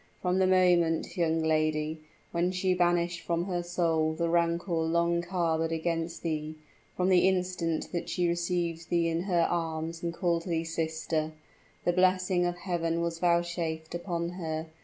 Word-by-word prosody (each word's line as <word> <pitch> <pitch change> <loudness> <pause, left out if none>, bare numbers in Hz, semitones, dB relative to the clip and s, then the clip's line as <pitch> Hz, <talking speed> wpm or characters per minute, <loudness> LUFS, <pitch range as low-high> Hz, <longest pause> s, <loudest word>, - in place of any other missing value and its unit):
From 180 +1 +1
the 190 - +4
moment, 175 -3 +3
young 165 -2 +1
lady, 155 0 +1 0.3
when 175 +1 +1
she 185 0 +1
banished 175 -1 +1
from 170 0 -1
her 180 -2 -1
soul 165 -2 +1
the 170 +1 -1
rancor 170 +2 +1
long 170 +1 +1
harbored 170 -2 0
there 165 - -1
against 165 0 -2
thee 155 -1 -2 0.4
from 185 +1 +2
the 185 0 +5
instant 180 -3 -1
that 175 - -3
she 175 -1 +1
received 170 -1 -1
thee 170 -1 +2
in 165 +1 0
her 175 -4 +2
arms, 165 -1 -2
and 170 - -2
called 170 -1 0
thee 165 -3 -1
sister 160 -1 -2 0.5
the 175 - +3
blessing 185 0 +3
of 175 0 -3
Heaven 170 -2 -1
was 165 -1 -2
vouchsafed 170 -2 0
unto 170 -1 -2
her. 160 -2 -3
170 Hz, 160 wpm, -29 LUFS, 165-175 Hz, 0.5 s, the